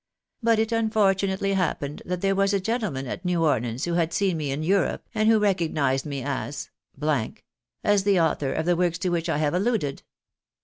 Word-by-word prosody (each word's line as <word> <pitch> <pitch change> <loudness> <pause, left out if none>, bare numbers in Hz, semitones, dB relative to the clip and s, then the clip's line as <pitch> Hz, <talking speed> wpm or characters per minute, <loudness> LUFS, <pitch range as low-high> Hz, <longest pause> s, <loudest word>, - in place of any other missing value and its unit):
But 230 -1 +3
it 220 +1 0
unfortunately 200 -3 +1
happened 155 -6 -1
that 180 0 -2
there 195 0 +2
was 195 +1 +2
a - - +2
gentleman 195 - -2
at 175 +8 -5
New 175 -2 +1
Orleans 120 -2 0
who 175 - -2
had 165 -1 +1
seen 195 -4 +1
me 150 -3 -3
in 140 +3 -2
Europe, 190 +2 0
and 215 0 +2
who 225 - +6
recognised 160 -10 +1
me 140 -3 -4
as, 140 +1 -4 1.1
as 205 -2 +3
the 195 -2 +3
author 150 -4 +1
of 160 - -2
the 175 0 +3
works 175 -1 +1
to 185 +1 -1
which 170 -1 -1
I - - +1
have 150 0 0
alluded. 185 - 0
180 Hz, 190 wpm, -25 LUFS, 150-200 Hz, 1.1 s, who